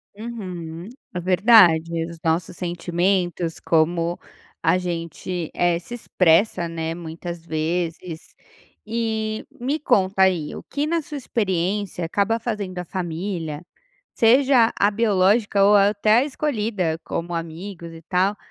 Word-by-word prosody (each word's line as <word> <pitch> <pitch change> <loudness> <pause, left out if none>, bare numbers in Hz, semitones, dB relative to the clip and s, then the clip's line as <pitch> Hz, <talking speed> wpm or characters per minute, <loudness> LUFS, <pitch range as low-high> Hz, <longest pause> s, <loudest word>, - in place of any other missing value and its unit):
Uhum, 185 -6 -7 0.3
é 180 - -1
verdade, 170 -4 +5
os 170 0 -9
nossos 165 +1 -1
sentimentos 175 0 -1
como 170 +1 +1 0.4
a 165 +3 +3
gente, 170 -1 -4
eh, 175 -1 +1
se 180 +7 -11
expressa, 180 -5 +2
né, 165 -1 -3
muitas 170 0 -7
vezes. 165 +1 -3 0.5
E, 220 -1 -2
me 275 +6 -1
conta 190 -8 +2
aí, 175 -5 +1
o - - -7
que 290 +1 -2
na 335 +1 0
sua 300 0 -9
experiência 195 -5 -1
acaba 205 +6 0
fazendo 210 -6 -4
à - - -3
família, 170 -3 -4 0.5
seja 245 0 +4
a 205 - +5
biológica 205 -1 +2
ou 205 +1 +6
até 205 +2 +4
a 260 - +1
escolhida 215 - -1
como 170 +1 -4
amigos 170 +1 -6
e 165 0 -11
tal, 190 +4 +1
185 Hz, 125 wpm, -22 LUFS, 170-215 Hz, 0.5 s, ou